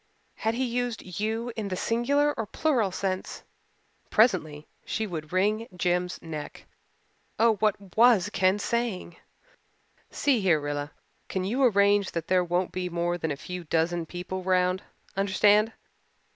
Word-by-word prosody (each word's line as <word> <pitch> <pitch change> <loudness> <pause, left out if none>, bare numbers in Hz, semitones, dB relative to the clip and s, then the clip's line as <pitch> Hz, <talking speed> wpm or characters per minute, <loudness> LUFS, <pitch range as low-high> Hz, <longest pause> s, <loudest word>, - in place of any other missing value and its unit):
Had 225 +1 -1
he 260 +2 0
used 245 -1 -2 0.2
"you" 225 +3 -2
in 220 -3 -3
the 185 - -2
singular 280 +9 +1
or 225 - -4
plural 245 -10 +1
sense? 185 0 -3 0.7
Presently 165 -10 +2 0.2
she 220 - -2
would 160 -6 -6
wring 210 +5 +1
Jims' 180 0 0
neck 155 -3 -7 0.7
oh, 225 -1 +4
what 200 -3 -1
was 220 -4 +5
Ken 185 +1 +3
saying? 215 -5 -2 0.9
"See 270 -6 +1
here, 175 -5 +3
Rilla, 145 0 -3 0.4
can 190 - -2
you 230 +8 -1
arrange 200 -4 +3
that 165 -1 -4
there 185 -1 +4
won't 175 +1 -1
be 180 -1 -3
more 175 0 -1
than 160 - -2
a 145 - -1
few 180 +5 -7
dozen 165 +1 0
people 180 +2 -5
round? 185 0 +2 0.3
Understand? 205 +3 +3
190 Hz, 145 wpm, -27 LUFS, 175-225 Hz, 0.9 s, was